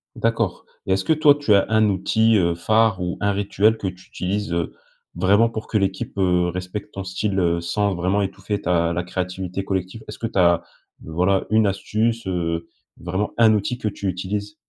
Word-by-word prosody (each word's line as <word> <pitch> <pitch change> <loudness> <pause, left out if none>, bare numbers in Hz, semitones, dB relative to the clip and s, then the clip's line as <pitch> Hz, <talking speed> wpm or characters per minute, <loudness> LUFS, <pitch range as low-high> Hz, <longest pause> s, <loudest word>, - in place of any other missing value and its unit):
D'accord - - -1 0.2
et 95 - +3
est-ce 95 - 0
que - - +4
toi 150 -2 +5
tu 145 -7 +2
as 100 - +4
un 110 -1 +4
outil, 110 +4 +2
heu, 85 -2 +2
phare 110 +2 +2
ou 90 0 -3
un 100 0 +2
rituel 100 +2 +2
que 100 - -6
tu 90 0 -8
utilises, 100 +1 -3
heu, 85 -1 -2 0.4
vraiment 100 +6 +3
pour 110 -1 -6
que 110 - 0
l'équipe, 100 +2 -2
heu, 90 -2 +2
respecte 90 +4 -5
ton 95 - -5
style, 95 +2 -2
heu, 85 -2 +1
sans 100 +4 0
vraiment 95 +3 0
étouffer 100 +2 -3
ta 85 -1 +1
la 85 - -1
créativité 90 +1 -4
collective? 95 +3 -3
Est-ce - - -8
que - - -4
tu 110 -3 -2
as, 85 -1 +4 0.4
voilà, 90 +5 +1
une 110 -1 +4
astuce, 110 +4 -1
heu, 85 -2 -2 0.3
vraiment 95 +4 -2
un 110 -2 +6
outil 105 +4 -1
que 110 - -3
tu 100 -1 -4
utilises? 100 +3 -3
95 Hz, 195 wpm, -22 LUFS, 90-105 Hz, 0.4 s, un